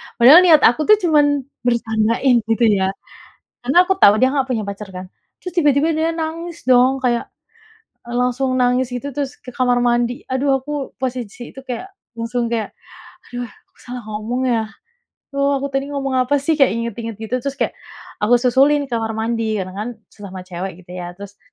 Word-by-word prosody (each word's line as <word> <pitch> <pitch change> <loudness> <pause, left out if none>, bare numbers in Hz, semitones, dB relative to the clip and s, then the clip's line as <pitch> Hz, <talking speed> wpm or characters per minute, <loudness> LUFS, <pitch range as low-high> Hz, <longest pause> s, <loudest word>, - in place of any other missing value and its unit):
Padahal 260 +8 +9
niat 330 -4 +6
aku 245 +6 +4
tuh 425 - +8
cuman 290 -4 +3 0.2
bercandain, 235 +1 +2
gitu, 225 +1 +1 0.2
ya, 190 - +1 0.8
karena 270 - 0
aku 385 +1 -1
tau 205 - +7
dia 260 - +5
nggak 270 -1 0
punya 235 -5 -2
pacar, 200 +1 -6
kan, 185 0 -7 0.4
terus 360 - -5
tiba-tiba 295 0 +3
dia 330 +1 0
nangis, 330 +1 -5
dong, 255 +1 +3
kayak, 240 -2 0 0.8
eee, 240 - -10
langsung 255 +1 0
nangis, 250 0 +1
gitu, 250 +3 -4
terus 285 -1 -4
ke 250 - -12
kamar 245 -1 +2
mandi. 240 0 0
Aduh, 260 +2 0
aku 290 0 -5
posisi 245 -2 -5
itu 270 - -10
kayak 365 +11 -7 0.2
langsung 235 +1 -2
kayak, 230 -2 -2 0.6
"Aduh, 245 0 -5
aku 225 - -20
salah 245 0 -6
ngomong, 220 +4 -3
ya, 225 -2 +1 0.7
duh, 280 0 +1
aku 275 0 -3
tadi 270 +1 -1
ngomong 275 -2 -3 0.2
apa, 285 - +2
sih?" 315 0 0
Kayak 270 - +5
ingat-ingat, 230 -1 -4
gitu 235 +3 -2
terus, 275 +2 -4
kayak - - -1 0.5
aku 225 +4 +4
susulin 275 +4 +4
ke 270 - -11
kamar 225 0 -3
mandi 225 0 -1
karena, 185 -2 -4
kan, 215 +3 -3 0.2
sesama 190 -3 -9
cewek, 185 0 -7
gitu, 175 - -14
ya, 175 0 -7
terus, 200 +1 -12
250 Hz, 180 wpm, -19 LUFS, 225-280 Hz, 0.8 s, Padahal